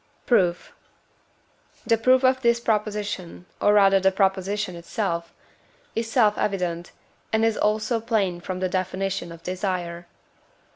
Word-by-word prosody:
Proof. 180 -8 +1 1.1
The 230 - +4
proof 255 +3 +3
of 260 0 +3
this 235 -1 +3
proposition, 210 -5 -2 0.2
or 205 - +4
rather 195 -1 +5
the 190 0 +3
proposition 195 0 0
itself, 170 -1 -3 0.6
is 225 0 -2
self 215 -5 +3
evident, 175 -4 -2 0.4
and 220 0 +2
is 225 -1 +2
also 215 +2 0
plain 210 -6 0
from 185 +1 -5
the 185 - +1
definition 185 0 -2
of 165 0 -12
desire. 180 -2 -3
195 Hz, 130 wpm, -24 LUFS, 180-220 Hz, 1.1 s, rather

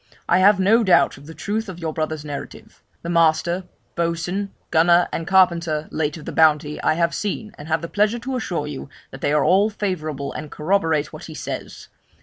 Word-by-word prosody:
I 175 - +4
have 200 +1 +5
no 220 +5 +4
doubt 185 -8 +4
of 140 +2 -14
the 160 - -10
truth 220 +1 -3
of 185 - -7
your 165 -2 -4
brother's 155 -1 -3
narrative; 145 -1 -8 0.2
the 170 - -4
master, 170 +2 +2 0.3
boatswain, 170 +4 -2 0.2
gunner, 170 +2 +4
and 165 - -3
carpenter, 170 -5 +2
late 150 0 -2
of 155 - -11
the - - -5
Bounty, 150 -2 +3
I 155 - +2
have 170 0 +1
seen, 210 +1 -4
and 145 - -9
have 160 0 0
the - - -3
pleasure 210 +5 +1
to 260 +3 -4
assure 175 -11 -2
you 145 -1 -7 0.2
that 135 - -10
they 145 - +1
are 150 - +3
all 200 +4 +4
favourable, 155 -9 -3
and 150 -1 -6
corroborate 160 -3 0
what - - -9
he - - -9
says. - - -6
170 Hz, 200 wpm, -22 LUFS, 155-190 Hz, 0.3 s, have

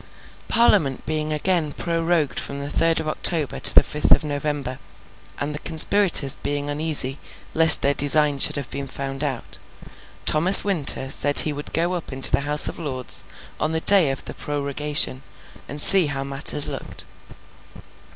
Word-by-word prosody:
Parliament 200 - -1
being 155 -1 -5
again 155 0 -3
prorogued 165 -2 -3
from 140 - -8
the 140 +1 -8
third 165 +1 -1
of 160 - -7
October 155 -1 -2
to - - +6
the - - +5
fifth 150 - -4
of - - +3
November, 145 -3 -6 0.6
and 145 +1 -6
the 150 - -8
conspirators 160 -3 +2
being 145 0 -5
uneasy 145 -3 -1 0.3
lest 160 -1 +6
their 140 - 0
design 145 0 +1
should - - +3
have 140 -3 -7
been 140 0 -8
found 135 +1 -8
out, 135 -5 -8 0.7
Thomas 170 +6 +7
Winter 150 -8 -1
said 145 0 +4
he 155 - -4
would 145 +1 -10
go 170 +3 -3
up 175 -5 -8
into 135 0 +3
the - - 0
House 150 0 +5
of - - -8
Lords 130 -6 -3 0.4
on 155 +1 -4
the 160 - -3
day 190 -6 +2
of 135 - -7
the - - -9
prorogation, 145 -1 -2 0.5
and 145 - -10
see 185 +2 +7
how 135 -2 -6
matters 140 +1 +1
looked. - - -8
150 Hz, 165 wpm, -19 LUFS, 140-160 Hz, 0.7 s, Thomas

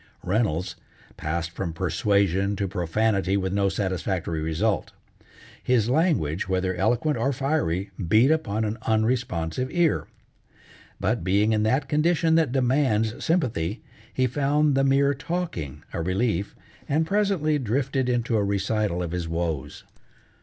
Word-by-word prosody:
Reynolds 90 -3 0 0.4
passed 80 +2 -3
from 85 -1 -4
persuasion 100 +2 +1
to 100 0 -2
profanity 95 +2 0
with 95 -1 -2
no 100 -1 +2
satisfactory 95 -4 -2
result. 85 +7 -1 0.7
His 120 -2 +2
language, 115 - +1
whether 95 0 0
eloquent 120 - +1
or 135 - +1
fiery, 125 - -1 0.2
beat 115 - +5
upon 110 -9 0
an 110 +1 -3
unresponsive 110 -2 0
ear. 175 -3 +1 0.9
But 110 +4 0
being 100 +4 +2
in 105 - +1
that 130 +6 +1
condition 160 +2 +2
that 160 -5 +3
demands 125 -4 +1
sympathy, 120 - 0 0.3
he 130 - +1
found 145 +3 +2
the 135 0 +2
mere 140 +1 +3
talking 135 - -4
a 85 - -2
relief, 100 +2 -1 0.3
and 155 +3 +2
presently 190 -6 +1
drifted 130 +2 -1
into 120 -2 +1
a 105 - +1
recital 100 -2 0
of 85 - -4
his 90 -1 -3
woes. 80 -4 -3
110 Hz, 130 wpm, -25 LUFS, 95-135 Hz, 0.9 s, beat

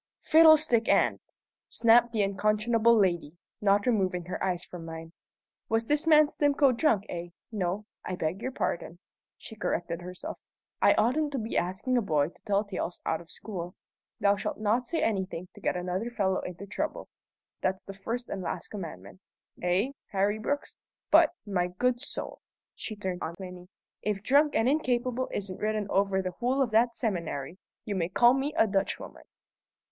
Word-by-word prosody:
"Fiddlestick 310 -7 +6
end!" - - +3 0.5
snapped 235 +1 +4
the 220 -3 +1
unconscionable 215 +4 +3
lady, 175 -5 +1 0.2
not 205 0 +3
removing 185 -7 +1
her 180 - -4
eyes 180 -2 -1
from 175 -2 -9
mine. 165 0 -8 0.6
"Was 225 0 +1
this 300 +2 +1
man 305 -1 +7
Stimcoe 285 -2 +3
drunk, 230 -8 +2
eh? 175 0 -5 0.2
No; 200 0 -2 0.2
I 185 - -3
beg 175 +4 -2
your 260 +2 -3
pardon," 170 -7 -3 0.4
she 220 - -10
corrected 170 -4 -2
herself. 180 +1 -7 0.4
"I - - +6
oughtn't 285 +6 +2
to - - -1
be 225 -1 -4
asking 190 +9 0
a - - +3
boy 155 -7 +1
to - - -23
tell 205 -1 +1
tales 190 -3 -4
out 160 - 0
of 170 - -16
school. 180 -4 -6 0.4
'Thou 200 0 +3
shalt - - -3
not 225 +4 +1
say 330 - 0
anything 190 -4 -2
to - - -15
get - - 0
another 180 +6 -2
fellow 195 -5 0
into 180 +2 -7
trouble' 300 +10 -4 0.5
that's 185 0 -1
the 195 - -8
first 230 +5 -4
and 195 - -4
last 180 - -4
commandment 165 - -8 0.4
eh, 185 +9 +1 0.2
Harry 200 +2 +1
Brooks? 285 +6 -3 0.3
But, 320 0 +7 0.2
my 180 -4 0
good 240 +7 0
soul" 285 - -5 0.3
she 215 - -5
turned 190 -3 -4
on 165 - -4
Plinny 180 -1 -9 0.3
"if 205 -2 -2
'drunk 290 +6 +4
and 225 - +3
incapable' 255 -3 0
isn't 190 -2 -4
written 215 0 -1
over 195 -1 +2
the 185 - -2
whole 250 +8 -1
of 240 - -3
that 235 +2 +3
seminary, 170 - -3 0.3
you 210 - -2
may 175 -3 -1
call 240 +6 +5
me 270 +2 -1
a 225 - +6
Dutchwoman!" 195 -2 -3
205 Hz, 170 wpm, -28 LUFS, 180-240 Hz, 0.6 s, man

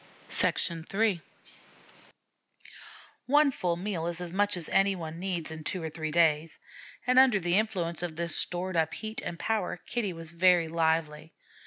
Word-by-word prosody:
III 180 +3 0 2.1
One 290 +1 +4
full 180 -8 -1
meal 175 -3 -3
is 175 0 -3
as 175 -1 -6
much 205 0 +2
as 170 - -1
any 195 0 +3
one 165 -2 -7
needs 175 -4 -2
in 160 0 -7
two 180 +2 -3
or 160 - -3
three 155 0 -4
days, 160 -1 +2 0.5
and 255 +1 +5
under 255 -6 +5
the 175 +2 +2
influence 180 -7 -2
of 175 -3 -4
this 170 +1 -2
stored 180 +1 0
up 160 -1 +1
heat 220 0 -5
and 170 - -5
power, 215 -1 -1
Kitty 230 -6 -2
was 165 -1 -5
very 175 -1 +4
lively. 160 -1 -1
175 Hz, 160 wpm, -29 LUFS, 165-195 Hz, 2.1 s, and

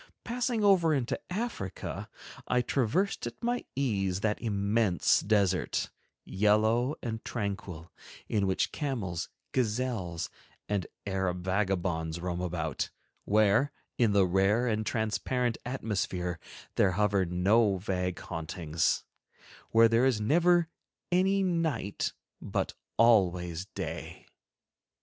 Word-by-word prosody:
Passing 240 -2 -1
over 175 -6 +5
into 130 -1 -1
Africa, 200 - -4 0.4
I 125 0 +2
traversed 135 - 0
at 120 - -9
my 240 +1 0
ease 100 -8 0
that 105 0 0
immense 100 -3 +2
desert, 100 -3 +1 0.3
yellow 110 +7 +2
and 110 -2 -4
tranquil, 100 -6 -4 0.4
in 100 -3 +1
which 95 - +1
camels, 105 - -3 0.2
gazelles, 110 -8 -1 0.4
and 100 -4 -1 0.2
Arab 95 -2 -1
vagabonds 95 -4 -1
roam 90 0 -3
about—where, 100 - 0 0.3
in 115 -4 +4
the 100 -2 +5
rare 95 +6 +2
and 110 -2 0
transparent 110 +3 0
atmosphere, 95 -8 -2 0.4
there 95 -2 +4
hover 100 0 +2
no 95 +4 +3
vague 90 -1 -2
hauntings, 80 -3 -1 0.7
where 115 0 +6
there 115 +3 +4
is 125 -5 +1
never 170 +9 +4 0.4
any 190 +2 +3
night, 160 - -1 0.3
but - - -2 0.2
always 90 -6 +3
day. - - -6
105 Hz, 105 wpm, -30 LUFS, 95-125 Hz, 0.7 s, where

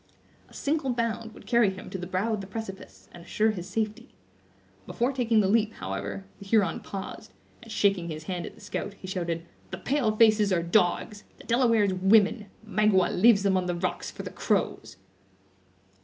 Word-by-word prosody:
A - - -19
single 290 -1 -1
bound 230 -2 -2
would - - -14
carry 235 -4 +4
him 190 -1 -8
to 190 - -4
the 180 - -5
brow 190 +5 -1
of 210 - -2
the 195 - -8
precipice, 195 -1 -8
and 175 - -12
assure 215 +5 +1
his 180 -4 -7
safety. 215 -1 -3 0.7
Before 245 +3 0
taking 235 -4 +2
the 195 - +1
leap, 220 +1 +2
however, 95 0 -5
the 200 - -11
Huron 200 -4 +2
paused, 195 0 -7 0.3
and 230 -2 -12
shaking 195 -5 +1
his 155 -1 -6
hand 175 +1 -4
at - - -11
the - - -17
scout, 205 0 -5
he 195 - -12
shouted: 170 -3 -3 0.2
"The 190 - -5
pale 235 +1 0
faces 215 -2 +5
are 170 -2 +2
dogs! 180 +3 +1
the - - -14
Delawares 230 -5 +3
women! 205 +3 +3 0.2
Magua 210 -2 +3
leaves 205 0 +5
them 195 -1 +3
on 185 -1 0
the 175 - -1
rocks, 180 +1 -3
for - - -8
the - - -6
crows!" - - -1
205 Hz, 185 wpm, -27 LUFS, 185-225 Hz, 0.7 s, faces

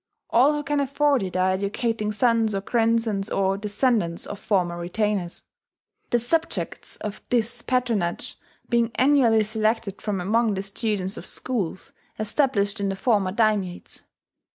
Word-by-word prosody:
All 265 +6 +5
who 295 - -3
can 290 0 0
afford 280 0 +2
it 185 -1 -3
are 185 0 +3
educating 210 +3 -1
sons 225 -1 +2
or 195 - -1
grandsons 225 -2 +1
or 195 0 +1
descendants 205 -3 0
of 205 - -7
former 180 -5 0
retainers; 185 0 -2 0.7
the 240 - +3
subjects 320 +8 -1
of 210 -1 -6
this 235 0 0
patronage 235 -10 -1 0.3
being 235 -1 +2
annually 255 -5 +4
selected 215 -1 -1
from 205 -3 -2
among 215 +3 +1
the 190 - -3
students 200 -1 -2
of - - -6
schools 205 -9 -3 0.3
established 215 -3 +1
in 200 -1 0
the 195 - -2
former 200 -3 +1
daimiates. 205 -4 -1
215 Hz, 140 wpm, -24 LUFS, 195-235 Hz, 0.7 s, All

